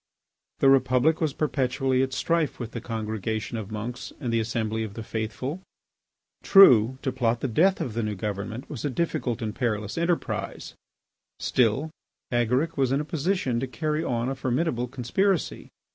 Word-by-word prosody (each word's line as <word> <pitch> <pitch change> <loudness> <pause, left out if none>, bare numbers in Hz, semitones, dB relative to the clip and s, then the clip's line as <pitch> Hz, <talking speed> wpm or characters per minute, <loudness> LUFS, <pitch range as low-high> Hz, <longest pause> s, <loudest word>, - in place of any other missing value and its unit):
The 135 - +6
Republic 130 +4 +3
was 155 -2 +2
perpetually 135 -2 0
at 130 0 0
strife 165 +3 0
with 120 -2 -5
the 115 - -5
congregation 110 -1 -3
of 110 -3 -5
monks 115 +3 -5
and 125 -5 -2
the 115 - +3
assembly 110 0 -1
of 105 -2 -7
the 115 - -5
faithful. 115 - -4 0.8
True, 130 - +7
to 130 - 0
plot 120 -2 0
the - - 0
death 180 - +3
of 120 - -3
the 115 - -1
new 105 -1 -2
government 105 +5 -4
was 140 - -7
a 145 - 0
difficult 130 -5 -1
and 105 -1 -2
perilous 110 +1 -2
enterprise. 170 0 -2 0.6
Still, 130 +6 +1 0.4
Agaric 125 +7 +1
was 135 -2 +2
in 135 - +2
a 150 - -2
position 160 -5 0
to 130 - -2
carry 155 +4 -2
on 120 -1 -1
a 135 - -1
formidable 130 -1 -1
conspiracy. 140 - -1
125 Hz, 165 wpm, -26 LUFS, 115-145 Hz, 0.8 s, True